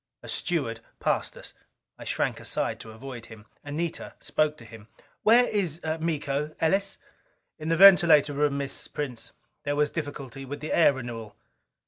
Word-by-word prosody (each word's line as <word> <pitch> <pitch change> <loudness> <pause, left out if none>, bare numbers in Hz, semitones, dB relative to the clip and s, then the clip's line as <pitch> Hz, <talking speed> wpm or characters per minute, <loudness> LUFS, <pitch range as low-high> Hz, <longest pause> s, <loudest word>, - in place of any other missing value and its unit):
A - - -10
steward 140 - -1 0.2
passed - - 0
us. - - -7 0.5
I - - -9
shrank - - -1
aside - - -2
to 110 - -10
avoid 120 +1 -9
him. 110 -1 -13 0.2
Anita 155 +3 -4
spoke 155 0 0
to 115 - -12
him. 110 -1 -13 0.3
"Where 235 +3 +6
is 180 -9 -1 0.2
Miko, 150 -2 -2
Ellis?" 195 +5 +1 0.6
"In 155 +1 -4
the 165 - +2
ventilator 170 -6 +8
room, 145 0 +1
Miss. 140 -1 -3
Prince. 130 -6 -5 0.3
There 145 0 -1
was 150 0 +2
difficulty 140 -4 -5
with 145 +2 -6
the 150 - -4
air 160 -4 +6
renewal." 115 -5 -7
145 Hz, 155 wpm, -27 LUFS, 130-160 Hz, 0.6 s, ventilator